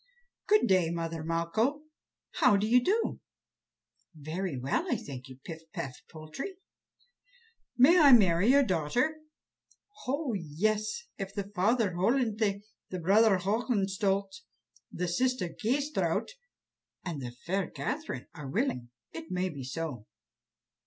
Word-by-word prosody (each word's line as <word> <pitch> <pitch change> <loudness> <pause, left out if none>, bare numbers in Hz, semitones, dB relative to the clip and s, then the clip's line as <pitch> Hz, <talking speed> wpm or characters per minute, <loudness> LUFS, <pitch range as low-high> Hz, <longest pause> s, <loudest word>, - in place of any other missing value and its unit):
"Good 425 0 +5
day, 185 -4 +3
mother 165 -1 -3
Malcho. 170 - 0 0.6
How 255 -9 +5
do 200 - 0
you 245 +3 +4
do?" 435 - 0 1.0
"Very 155 +1 -4
well, 130 +2 -1
I - - +3
thank 130 -2 -7
you, 130 - -11
Pif 165 -2 -6
paf 135 - -4 0.2
Poltrie." 160 - -7 1.2
"May 310 +9 +7
I 290 -4 +8
marry 190 -5 +6
your 280 +3 +6
daughter?" 225 - 0 0.9
"Oh, 275 -1 -1
yes! 210 - -1 0.2
if 195 0 -5
the 200 -1 -4
father 210 +2 +2
Hollenthe, 210 0 +1 0.3
the 185 - -4
brother 200 +4 +4
Hohenstolz, 200 +4 0 0.5
the 180 +1 -2
sister 230 +1 0
Kâsetraut, 275 - -1 0.8
and 165 -6 -4
the 120 -2 -6
fair 190 +2 -1
Catherine 305 +4 -4
are 150 -4 -8
willing, 135 - -1 0.2
it 325 0 -8
may 185 +1 -1
be 140 -6 -7
so." 130 -4 -5
195 Hz, 125 wpm, -30 LUFS, 165-250 Hz, 1.2 s, I